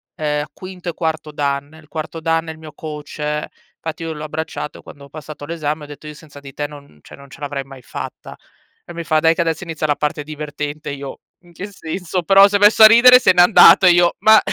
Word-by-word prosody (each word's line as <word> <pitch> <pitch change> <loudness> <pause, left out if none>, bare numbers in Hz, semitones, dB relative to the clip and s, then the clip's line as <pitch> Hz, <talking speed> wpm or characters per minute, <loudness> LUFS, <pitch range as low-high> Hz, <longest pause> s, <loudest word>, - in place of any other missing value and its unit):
ehm, 150 -1 -2
quinto 185 -1 -8
e 170 - -5
quarto 160 -2 -4
dan. 145 +1 -3
Il 155 - -22
quarto 160 +1 -6
dan 165 0 -1
è - - -4
il 160 - -12
mio 155 -1 -11
coach, 150 -1 -5 0.3
fatti 160 0 -6
io 165 -1 -4
l'ho 150 0 -8
abbracciato 155 0 -6
quando 140 -1 -13
ho - - -18
passato 150 0 -10
l'esame 155 -1 -4
e - - -9
o - - -14
detto: 145 +1 -12
"Io 150 - -8
senza 150 -2 -15
di 140 -1 -13
te 145 +2 -4
non 140 - -15
cioè, - - -15
non 140 0 -16
ce 135 - -15
l'avrei 145 -1 -5
mai 135 -1 -14
fatta." - - -9 0.5
E 175 - -11
mi 170 - -6
fa: 155 -1 +1
"Dai 160 +1 +3
che 170 - -2
adesso 165 +1 -2
inizia 160 -3 -4
la 145 - +1
parte 150 +1 -3
divertente." 150 -1 -6
Io: 140 -1 -8 0.2
"In 175 -1 -22
che 190 +4 -7
senso?" 180 0 -5
Però 195 +3 +6
s'è 205 0 0
messo 210 +2 +6
a - - +12
ridere 240 +3 +7
e - - +8
se 220 - +4
n'è 180 - +5
andato 190 0 +7
e - - +7
io: 175 0 +3
"Ma" 220 0 +6
155 Hz, 250 wpm, -18 LUFS, 145-170 Hz, 0.5 s, a